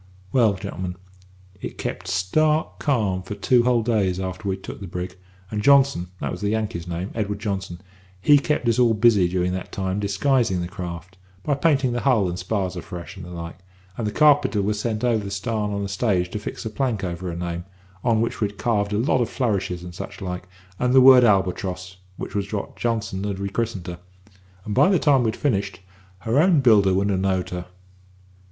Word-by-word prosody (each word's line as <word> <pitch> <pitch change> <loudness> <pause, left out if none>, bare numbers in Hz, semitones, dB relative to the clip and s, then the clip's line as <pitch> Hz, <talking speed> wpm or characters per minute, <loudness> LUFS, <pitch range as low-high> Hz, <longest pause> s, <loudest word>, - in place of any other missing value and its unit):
"Well, 115 -5 +4
gentlemen, 90 -1 -5 0.7
it - - -6
kept - - -5
stark 150 +13 +1
calm 105 -10 0
for 95 +3 -7
two 120 +4 +3
whole 120 -2 +3
days 100 -6 +1
after 95 +2 -4
we'd 95 0 -3
took - - -7
the 100 - -6
brig, 90 +1 -5 0.4
and 105 -1 -2
Johnson 135 -7 +4
that - - -3
was - - -6
the 100 - 0
Yankee's 105 -6 -2
name, 90 +3 -4
Edward 105 -2 -2
Johnson 95 -4 -4 0.4
he 145 +9 +6
kept 145 -3 -1
us 115 +1 +2
all 120 -2 +4
busy 105 -5 +4
during 90 0 0
that 95 - -5
time 95 0 -2
disguising 105 0 +1
the 85 - -3
craft, 90 -1 -8 0.2
by 145 - +1
painting 140 -3 +2
the 120 - -1
hull 120 -8 +3
and 90 +1 -4
spars 95 -1 -2
afresh, 90 -1 -7
and - - -9
such - - -10
like; 85 0 -7 0.4
and 110 - -3
the - - -1
carpenter 145 -4 +4
he 100 - 0
was 105 0 -1
sent 110 0 -2
over 115 -4 +2
the 100 - -5
starn 105 +1 -2
on 100 0 -2
a - - -2
stage 95 -3 0
to 105 - -3
fix 105 - -6
a 110 - -3
plank 115 -4 -1
over 90 0 -4
the 85 - -5
name, 85 0 -4 0.4
on 115 -2 +2
which 115 - -1
he'd 105 -1 -2
carved 105 -3 0
a - - +1
lot 125 +2 +2
of 120 - 0
flourishes 100 -8 -1
and 90 -1 -8
such - - -8
like, 90 -1 -5 0.3
and 125 +1 +2
the - - +9
word 130 -1 +8
Albatross, 95 -3 0 0.2
which - - -6
was 100 -1 -2
what 100 -2 -4
Johnson 110 -5 -2
had 100 -2 -2
re 100 0 -3
christened 110 -4 -3
her, 85 0 -6 0.7
and 105 - -3
by 140 - +5
the 190 - +4
time 145 -5 +4
we'd 110 -1 0
finished, 100 -8 -1 0.4
her 115 +7 +1
own 170 -1 +5
builder 105 -6 +5
wouldn't 100 +1 +1
have 95 - 0
knowed 95 -1 0
her. 90 0 -5
100 Hz, 210 wpm, -23 LUFS, 95-120 Hz, 0.7 s, the